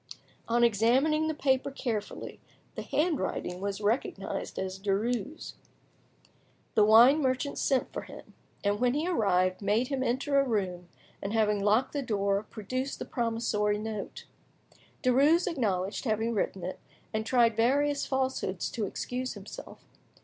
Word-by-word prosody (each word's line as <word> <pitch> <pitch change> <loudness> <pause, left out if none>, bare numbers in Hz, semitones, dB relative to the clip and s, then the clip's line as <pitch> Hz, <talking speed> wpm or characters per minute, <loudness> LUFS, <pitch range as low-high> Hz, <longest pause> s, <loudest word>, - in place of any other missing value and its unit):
On 240 +1 +2
examining 255 +8 +3
the 315 - -1
paper 265 -2 +1
carefully, 235 -6 -4 0.3
the - - -5
handwriting 295 - -1
was 200 +1 -3
recognised 205 -2 -2
as 190 0 -4
Derues'. 210 +7 -2 1.2
The 215 - +5
wine 235 +8 +7
merchant 260 +1 -1
sent 265 -2 0
for - - -3
him, - - -12 0.3
and 205 0 +1
when 250 +1 +2
he 310 +4 0
arrived, 185 - +1
made 210 +5 +1
him 270 -2 -1
enter 265 +3 +1
a - - +4
room, 185 -8 -2 0.3
and 200 +2 -3
having 210 -2 +2
locked 215 +6 +2
the 290 - -1
door, 200 -5 0
produced 255 +6 -4
the - - -6
promissory 225 -3 0
note. 215 -1 -6 0.8
Derues 285 +7 +4
acknowledged 210 - -1
having 225 0 0
written 195 -3 -2
it, 185 - -5 0.3
and 220 0 0
tried 235 -1 +3
various 280 +5 +2
falsehoods 260 -9 -1
to 215 -4 -2
excuse 250 +5 -4
himself. 200 0 -10
230 Hz, 140 wpm, -29 LUFS, 205-265 Hz, 1.2 s, wine